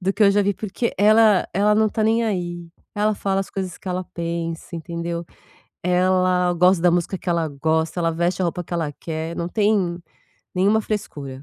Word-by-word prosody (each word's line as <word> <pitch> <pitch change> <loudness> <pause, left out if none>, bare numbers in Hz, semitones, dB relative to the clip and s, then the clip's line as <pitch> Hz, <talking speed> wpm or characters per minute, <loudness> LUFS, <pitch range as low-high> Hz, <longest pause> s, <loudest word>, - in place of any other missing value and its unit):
Do 195 +1 0
que 210 - 0
eu 200 - +7
já 205 +1 +3
vi, 200 +1 +1
porque 215 +4 -3
ela 215 -1 +5
ela 210 +3 +3
não 220 0 +3
está 215 +1 -1
nem 225 +2 +3
aí. 175 -4 -3 0.3
Ela 210 +1 +1
fala 195 -1 -1
as 195 - -5
coisas 185 -2 -4
que - - -8
ela 185 0 -2
pensa, 170 0 -4
entendeu. 170 +1 -4 0.6
Ela 180 0 +2
gosta 180 0 +4
da 180 - +5
música 175 +2 0
que 180 - -5
ela 170 -2 +1
gosta. 160 +4 -1
Ela 165 -1 +1
veste 175 +2 -1
a - - +2
roupa 175 +1 -2
que 175 - -8
ela 165 -4 -1
quer, 160 0 -4
não 170 - -2
tem 200 -5 +1 0.6
nenhuma 200 +4 +3
frescura. 140 -11 -5
180 Hz, 200 wpm, -22 LUFS, 170-200 Hz, 0.6 s, eu